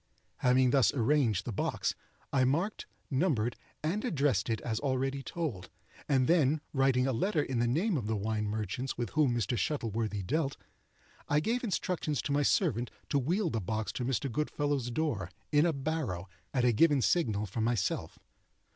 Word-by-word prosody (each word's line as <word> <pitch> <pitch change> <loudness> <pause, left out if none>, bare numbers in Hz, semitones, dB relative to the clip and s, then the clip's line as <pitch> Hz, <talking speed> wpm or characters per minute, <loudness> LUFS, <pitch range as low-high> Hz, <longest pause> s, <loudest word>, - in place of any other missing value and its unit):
Having 125 0 +4
thus 135 -2 +4
arranged 120 -6 +2
the - - -3
box, 100 - -1 0.4
I 130 -2 +4
marked, 165 +11 0 0.2
numbered, 130 -6 +1 0.3
and 180 +8 -1
addressed 140 - +1
it 110 - 0
as 110 -2 -2
already 135 0 -1
told; 130 - -4 0.4
and 130 -3 +3
then 155 -3 +4
writing 135 -2 +3
a 135 - +1
letter 155 - +1
in 130 -4 -2
the 120 - +2
name 165 - +1
of 110 -6 -3
the 110 - 0
wine 105 +1 -1
merchants 110 +5 -3
with 120 - -3
whom 145 -6 +2
Mr. 120 +1 0
Shuttleworthy 110 -7 -1
dealt, 140 - -1 0.7
I 145 - +4
gave 230 +9 -1
instructions 180 - -1
to 140 - -2
my 145 +1 +3
servant 130 - +2 0.2
to 140 - +2
wheel 170 - 0
the 115 - -1
box 110 +3 -2
to - - -4
Mr. 130 0 -1
Goodfellow's 145 -1 -1
door, 120 - -1 0.2
in 150 +2 +5
a - - +3
barrow, 135 - -3 0.2
at 125 -2 +1
a 125 - +5
given 145 +2 +4
signal 110 - +1
from 110 +3 -3
myself. 115 -4 -1
130 Hz, 175 wpm, -31 LUFS, 115-150 Hz, 0.7 s, in